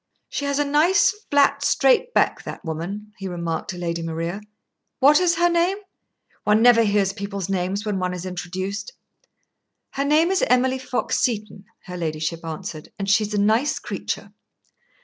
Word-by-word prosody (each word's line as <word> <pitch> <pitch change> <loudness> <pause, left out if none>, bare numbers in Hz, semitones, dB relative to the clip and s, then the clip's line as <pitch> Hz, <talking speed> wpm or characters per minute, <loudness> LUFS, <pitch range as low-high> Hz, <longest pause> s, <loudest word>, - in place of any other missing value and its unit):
"She 285 - -3
has 280 0 0
a 290 - +2
nice, 340 +7 +4 0.2
flat, 285 -1 +3
straight 275 - +3
back, - - +2
that - - -8
woman," 195 +7 -5
he 195 - -5
remarked 170 -1 -4
to 185 - -4
Lady 170 -1 -3
Maria. 165 +4 -4 0.6
"What 290 +2 +6
is 355 -2 +2
her 345 - +3
name? 345 +3 +2 0.7
One 210 +2 +3
never 240 -1 +7
hears 200 -3 +2
people's 200 -1 -5
names 195 +2 -1
when 205 -3 -1
one 180 0 -1
is 180 0 -6
introduced." 185 +3 -5 1.0
"Her 275 - -2
name 310 +5 +3
is 385 - +1
Emily 255 +1 +2
Fox 255 -1 -1
Seton," 210 -4 -2 0.2
her 180 -1 -7
ladyship 160 0 -3
answered, 160 -1 -6
"and 195 - -4
she's 210 0 +2
a - - +1
nice 220 +8 +2
creature." - - -5
205 Hz, 165 wpm, -23 LUFS, 180-275 Hz, 1.0 s, never